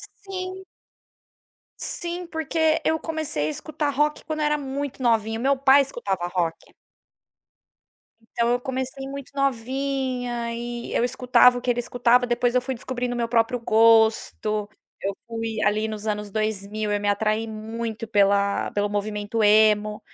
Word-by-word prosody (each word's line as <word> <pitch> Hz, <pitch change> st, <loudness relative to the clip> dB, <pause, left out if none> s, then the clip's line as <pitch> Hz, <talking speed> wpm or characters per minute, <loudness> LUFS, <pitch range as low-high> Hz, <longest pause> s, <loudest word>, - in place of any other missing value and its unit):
Sim. 375 Hz, -1 st, -6 dB, 1.2 s
Sim, 345 Hz, +1 st, -3 dB
porque 320 Hz, 0 st, +1 dB
eu 320 Hz, 0 st, +2 dB
comecei 310 Hz, -, -2 dB
a -, -, -1 dB
escutar 295 Hz, -, -3 dB
rock 295 Hz, +2 st, 0 dB
quando 310 Hz, -1 st, -4 dB
era 300 Hz, 0 st, +2 dB
muito 280 Hz, -1 st, -4 dB
novinha, 225 Hz, -2 st, +1 dB
meu 275 Hz, +3 st, +2 dB
pai 270 Hz, +1 st, +6 dB
escutava 200 Hz, -10 st, -3 dB
rock. 175 Hz, -2 st, -3 dB, 1.6 s
Então, 235 Hz, 0 st, 0 dB
eu 245 Hz, -, +1 dB
comecei 260 Hz, +1 st, -4 dB
muito 275 Hz, -1 st, -8 dB
novinha 255 Hz, -2 st, -1 dB
e 240 Hz, 0 st, -5 dB
eu -, -, +2 dB
escutava 250 Hz, 0 st, +4 dB
o -, -, -5 dB
que 250 Hz, -, -3 dB
ele 245 Hz, -, -1 dB
escutava, 245 Hz, +1 st, +2 dB
depois 240 Hz, 0 st, +1 dB
eu 250 Hz, -, +4 dB
fui 265 Hz, +1 st, -4 dB
descobrindo 250 Hz, 0 st, -3 dB
o -, -, -3 dB
meu 235 Hz, -1 st, 0 dB
próprio 230 Hz, +1 st, +1 dB
gosto. 220 Hz, -2 st, +3 dB, 0.3 s
Eu 195 Hz, 0 st, -3 dB
fui 225 Hz, -1 st, -4 dB
ali 215 Hz, +1 st, +1 dB
nos 215 Hz, -1 st, -6 dB
anos 210 Hz, -1 st, -2 dB
2000, 215 Hz, 0 st, -2 dB
eu 205 Hz, -, +1 dB
me 205 Hz, -, -1 dB
atraí 215 Hz, +2 st, 0 dB
muito 225 Hz, +1 st, -5 dB
pela 200 Hz, -1 st, +2 dB
pelo 205 Hz, 0 st, 0 dB
movimento 210 Hz, +1 st, -2 dB
emo. 210 Hz, 0 st, +4 dB
235 Hz, 150 wpm, -24 LUFS, 215-270 Hz, 1.6 s, pai